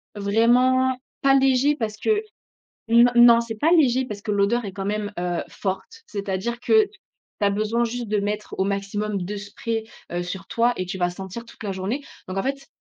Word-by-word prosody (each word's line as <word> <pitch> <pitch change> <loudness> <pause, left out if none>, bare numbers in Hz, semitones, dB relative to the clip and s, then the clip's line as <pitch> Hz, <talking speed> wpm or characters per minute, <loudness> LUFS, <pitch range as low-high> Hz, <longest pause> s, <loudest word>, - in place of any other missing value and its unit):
vraiment 250 +5 +3 0.2
pas 275 0 +5
léger 270 +2 +3
parce 215 -6 -3
que 425 - +1 0.7
n 235 +2 +6
non, 240 -1 +8
c'est 235 -1 -5
pas 300 +9 +2
léger 260 -6 +4
parce 210 -4 -6
que 210 - -4
l'odeur 205 +4 +2
est 195 - -5
quand 195 0 -5
même, 205 0 -2
heu, 175 -1 -1
forte. 330 - -5
C'est-à-dire 200 +3 -3
que 440 - +5
tu - - -20 0.5
as 200 -1 +3
besoin 215 +3 0
juste 240 +1 -3
de 210 0 +1
mettre 210 +1 -3
au 190 - +2
maximum 200 +1 -2
2 205 +4 -4
sprays, 220 +2 -4 0.3
heu, 175 0 -1
sur 190 +2 -6
toi 235 +1 +2
et 185 - -2
tu 190 +1 -5
vas 175 -1 +1
sentir 190 +5 -7
toute 230 - -14
la 200 - -2
journée. 195 +9 -3 0.3
Donc 185 +1 -3
en - - 0
fait, 275 +1 -3
215 Hz, 200 wpm, -23 LUFS, 200-245 Hz, 0.7 s, non